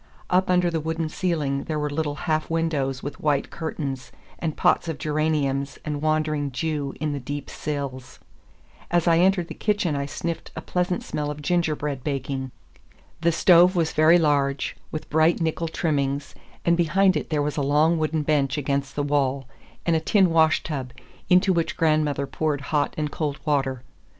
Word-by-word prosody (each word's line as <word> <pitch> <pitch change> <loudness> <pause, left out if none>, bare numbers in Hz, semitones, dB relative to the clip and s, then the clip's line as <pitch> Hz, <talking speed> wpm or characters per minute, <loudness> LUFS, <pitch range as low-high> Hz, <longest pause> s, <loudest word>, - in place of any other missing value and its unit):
Up 185 +1 +3
under 180 -1 +3
the 165 - 0
wooden 160 +1 -2
ceiling 155 -6 -1
there 155 - -2
were 150 0 -1
little 145 0 -2
half 155 -2 0
windows 150 -6 -1
with 145 - -6
white 145 -2 0
curtains, 140 -5 -5 0.3
and 160 -3 -3
pots - - +3
of 160 - -3
geraniums 150 -3 -1
and 150 -1 -3
wandering 155 -2 0
Jew 145 0 -2
in 150 0 -1
the 140 - -3
deep 140 +2 -6
sills. 140 -4 -5 0.7
As 175 0 +1
I 165 -1 +5
entered 180 -1 +3
the - - -7
kitchen 205 -7 0
I 140 0 -2
sniffed 165 +3 -4
a - - -5
pleasant 180 0 -1
smell 150 -1 -3
of 150 0 -6
gingerbread 150 -5 -1
baking. 135 -2 -3 0.7
The 170 0 +3
stove 175 +2 +5
was 165 -2 +1
very 155 +3 +6
large, 140 -4 +1 0.2
with 155 - -5
bright 160 +2 +3
nickel 165 +1 -1
trimmings, 140 -3 -1 0.3
and 170 - +4
behind 185 +3 +3
it 150 - -3
there 150 -3 +1
was 150 0 -2
a 145 - -1
long 150 +4 +3
wooden 155 0 0
bench 140 -2 +1
against 140 -1 -2
the 145 - 0
wall, 140 -2 0 0.4
and 170 - +3
a - - +3
tin 185 +2 +3
washtub, 155 -5 +1 0.4
into 185 +1 +5
which 165 -2 -1
grandmother 155 -3 +2
poured 150 0 -2
hot 145 0 -1
and 150 -1 -2
cold 145 -3 -3
water. 135 -4 0
155 Hz, 175 wpm, -24 LUFS, 140-165 Hz, 0.7 s, very